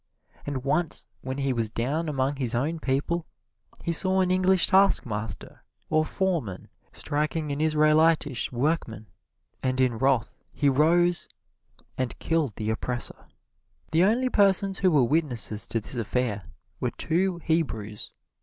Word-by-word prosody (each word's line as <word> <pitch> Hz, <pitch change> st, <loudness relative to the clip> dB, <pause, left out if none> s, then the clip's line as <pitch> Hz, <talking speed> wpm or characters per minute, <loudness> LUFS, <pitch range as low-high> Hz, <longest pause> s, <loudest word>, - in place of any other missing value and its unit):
And 135 Hz, -3 st, -3 dB
once 155 Hz, +4 st, +1 dB, 0.2 s
when 130 Hz, 0 st, -5 dB
he 135 Hz, -1 st, 0 dB
was 115 Hz, -2 st, +1 dB
down 140 Hz, +9 st, -2 dB
among 135 Hz, 0 st, -1 dB
his 125 Hz, -3 st, -2 dB
own 155 Hz, +7 st, -1 dB
people 155 Hz, +5 st, -1 dB, 0.6 s
he 170 Hz, -, -1 dB
saw 190 Hz, +3 st, +3 dB
an 180 Hz, -1 st, +1 dB
Egyptian 185 Hz, +1 st, +3 dB
taskmaster 110 Hz, -, +1 dB, 0.3 s
or 155 Hz, 0 st, +3 dB
foreman 165 Hz, -, -2 dB, 0.2 s
striking 150 Hz, +1 st, -2 dB
an 140 Hz, +1 st, -2 dB
Israelitish 155 Hz, -3 st, +3 dB
workman, 120 Hz, -4 st, -1 dB, 0.6 s
and 130 Hz, 0 st, -1 dB
in 125 Hz, -3 st, +1 dB
wrath 130 Hz, -3 st, +1 dB, 0.2 s
he 145 Hz, -, +1 dB
arose 170 Hz, +5 st, +3 dB, 0.7 s
and 130 Hz, -3 st, -2 dB
killed 155 Hz, -10 st, -1 dB
the 110 Hz, 0 st, -2 dB
oppressor. 120 Hz, +2 st, -4 dB, 0.6 s
The 165 Hz, +2 st, +4 dB
only 240 Hz, +6 st, +2 dB
persons 195 Hz, -3 st, +2 dB
who 185 Hz, -, +4 dB
were 150 Hz, -6 st, +4 dB
witnesses 120 Hz, -6 st, 0 dB
to 115 Hz, -, -1 dB
this 105 Hz, -, -8 dB
affair 115 Hz, -3 st, -2 dB, 0.3 s
were -, -, 0 dB
two 180 Hz, +2 st, -1 dB
Hebrews. 140 Hz, -12 st, -2 dB
145 Hz, 135 wpm, -26 LUFS, 125-170 Hz, 0.7 s, The